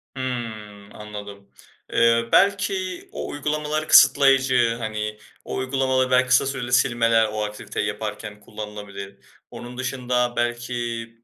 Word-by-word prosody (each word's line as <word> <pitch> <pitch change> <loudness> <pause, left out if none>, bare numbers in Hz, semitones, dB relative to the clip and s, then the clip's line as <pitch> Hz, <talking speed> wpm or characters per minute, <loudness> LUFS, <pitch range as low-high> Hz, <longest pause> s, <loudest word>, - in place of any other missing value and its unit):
Hımm. 110 -6 -6
Anladım. 105 -1 -9 0.4
Eee, 115 0 +3
belki 195 -2 +1
o - - -5
uygulamalar 150 +1 -2
kısıtlayıcı, 130 -3 +5
hani, 105 -1 -4 0.3
o - - -5
uygulamaları 130 0 0
belki 130 0 +4
kısa 130 +1 +4
süreli 125 -2 -3
silmeler 115 -3 +3
o 110 0 -2
aktiviteyi 105 0 -4
yaparken 105 -1 -5
kullanılabilir. 105 -2 -9 0.3
Onun 125 +1 -9
dışında 125 -2 -1
belki 120 -1 -2
120 Hz, 110 wpm, -23 LUFS, 105-130 Hz, 0.4 s, kısıtlayıcı